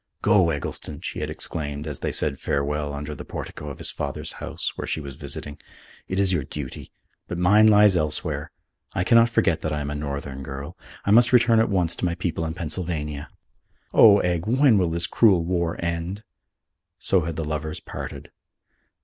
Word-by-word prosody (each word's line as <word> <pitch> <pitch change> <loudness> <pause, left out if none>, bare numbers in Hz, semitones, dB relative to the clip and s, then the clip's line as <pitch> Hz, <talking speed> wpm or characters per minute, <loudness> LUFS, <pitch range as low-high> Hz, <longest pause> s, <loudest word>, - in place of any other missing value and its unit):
"Go, 105 -6 +4
Eggleston!" 75 0 -4
she - - -5
had - - -3
exclaimed, 75 -2 -3
as 75 -4 -4
they - - -2
said - - +2
farewell 75 +1 -1
under 75 +1 -5
the - - -8
portico 75 - -7
of 70 - -8
his - - -1
father's - - -4
house - - -3
where - - -5
she - - -1
was 70 -3 -7
visiting, 75 +3 -7 0.5
"it 95 - -2
is 95 -1 +3
your 80 -6 0
duty. 70 -1 -7 0.4
But 85 - -4
mine 105 +5 +5
lies 105 -2 +6
elsewhere. 75 -2 -1 0.4
I - - 0
cannot 115 +3 +5
forget 115 - +1
that 80 - -2
I 75 - -1
am 75 0 -3
a - - -2
Northern 70 -2 -5
girl. 70 +1 -7 0.3
I 100 - +2
must 115 +2 +6
return 120 -2 +5
at 110 - +2
once 90 -4 +1
to - - -2
my 85 -1 0
people 85 -2 -2
in 80 0 -4
Pennsylvania. 75 -4 -3 0.6
Oh, 105 -3 +8
Egg, 90 +1 -1
when 125 -2 +4
will 90 -3 +1
this 85 +1 0
cruel 95 -6 +4
war 85 -1 0
end?" 85 +5 -3 0.7
So 95 -1 +2
had 85 -1 -3
the 80 0 -3
lovers 75 0 -3
parted. - - -8
85 Hz, 190 wpm, -24 LUFS, 75-95 Hz, 0.7 s, Oh